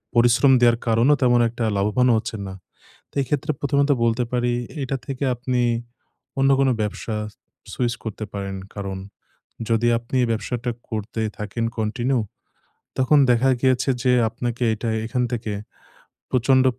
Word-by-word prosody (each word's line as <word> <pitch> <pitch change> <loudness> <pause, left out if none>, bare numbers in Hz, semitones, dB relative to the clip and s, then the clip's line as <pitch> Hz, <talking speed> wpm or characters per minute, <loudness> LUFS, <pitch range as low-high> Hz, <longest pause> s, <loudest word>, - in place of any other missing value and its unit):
পরিশ্রম 120 +3 +5
দেয়ার 120 -1 +5
কারণও 115 +6 +4
তেমন 120 -1 +4
একটা 120 +1 -4
লাভবান 105 +6 +2
হচ্ছেন 110 -1 -4
না। 95 - -6 0.6
তাই - - -3
এই - - -7
ক্ষেত্রে 150 +2 0
প্রথমত 140 0 +1 0.2
বলতে 115 +1 +1
পারি, 120 -1 +1 0.3
এইটা 135 0 -2
থেকে 135 0 -4
আপনি, 125 0 -1 0.8
অন্য 135 0 +4
কোন 135 -1 +4
ব্যবসা 105 +1 -3 0.6
সুইচ 120 -2 0
করতে 110 -1 -5
পারেন। 100 -1 -4 0.2
কারণ, 100 -2 -4 0.7
যদি 115 0 +2
আপনি 120 +3 -3
ব্যবসাটা 120 +2 -2 0.2
করতেই 110 0 -3
থাকেন 105 +2 -3
কন্টিনিউ, 120 +4 0 0.8
তখন 130 +3 +4
দেখা 120 +2 +3
গিয়েছে 130 0 +2
যে, 125 - +4 0.2
আপনাকে 120 +2 -3
এটা 110 +2 -3 0.2
এখান 125 +2 -1
থেকে 110 -3 -3 0.8
প্রচন্ড 130 +1 +3
120 Hz, 140 wpm, -23 LUFS, 110-130 Hz, 0.8 s, পরিশ্রম